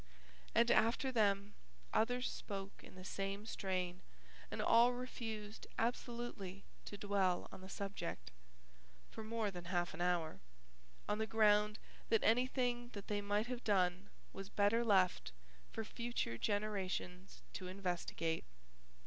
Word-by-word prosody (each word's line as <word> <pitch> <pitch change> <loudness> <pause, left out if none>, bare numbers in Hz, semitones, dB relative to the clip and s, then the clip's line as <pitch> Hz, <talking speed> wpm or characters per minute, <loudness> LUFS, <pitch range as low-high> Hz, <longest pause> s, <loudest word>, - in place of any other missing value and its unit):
And, 235 +1 +6
after 235 +4 +4
them, 205 -3 +2 0.4
others 245 +3 +2
spoke 195 -1 -5
in - - -12
the 185 0 -10
same 195 +2 -3
strain 185 -4 -2 0.5
and - - -5
all 235 +2 +6
refused 225 -4 -5
absolutely 230 -5 -2 0.2
to 205 - -6
dwell 195 -3 +1
on - - -9
the 190 - -9
subject 195 - -4 0.8
(for 220 - -6
more 220 -1 -1
than 175 -2 -7
half 175 -1 0
an - - -5
hour) 175 -3 +1 0.7
on 210 +1 0
the 220 - 0
ground 210 0 +4 0.3
that 225 - +4
anything 245 0 +2
that 200 -2 -7
they 205 -1 +1
might 205 +2 +1
have 245 0 -4
done 185 -2 +2 0.2
was 195 0 -6
better 205 +4 +3
left 190 - +3 0.4
for 225 - -3
future 235 - -2
generations 195 - -2
to 185 - -5
investigate. 175 -3 -1
205 Hz, 130 wpm, -38 LUFS, 185-225 Hz, 0.8 s, And